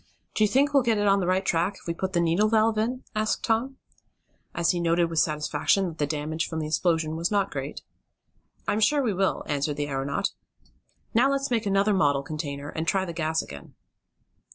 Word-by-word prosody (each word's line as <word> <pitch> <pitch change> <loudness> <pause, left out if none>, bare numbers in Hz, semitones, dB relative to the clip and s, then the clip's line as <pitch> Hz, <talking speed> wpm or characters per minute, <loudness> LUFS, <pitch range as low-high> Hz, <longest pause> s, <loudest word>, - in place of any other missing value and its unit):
"Do 215 - +2
you - - +5
think 275 +6 +2
we'll 275 - +5
get 230 -3 +1
on 200 -1 +3
the 180 - -1
right 185 +1 +1
track 175 +4 +1
if - - -17
we 170 - -2
put 190 +3 -4
the 175 - +2
needle 170 +6 +2
valve 220 0 +3
in?" 245 +4 -2
asked 215 0 0
Tom, 245 +4 0 0.8
as 170 -1 +2
he 175 - -2
noted 170 0 +1
with 165 - +1
satisfaction 150 +5 +1
that 165 - -11
the 145 - +1
damage 155 +2 -2
from 160 - -4
the 155 - -2
explosion 160 0 0
was 170 +1 -1
not 200 -2 +1
great. 140 +1 -5 0.8
"I'm 210 - +1
sure 285 +6 +3
we 225 -5 0
will," 190 +1 0
answered 145 0 -1
the 145 0 -2
aeronaut. 140 +7 -1 0.8
"Now 245 +4 +4
let's 275 -1 -1
make 225 -3 0
another 200 +1 +2
model 145 -7 +2
container, 145 -1 -5
and 160 +1 -4
try 190 +1 +1
the 170 - -6
gas 160 -1 -1
again." 70 -1 -11
175 Hz, 205 wpm, -26 LUFS, 155-215 Hz, 0.8 s, you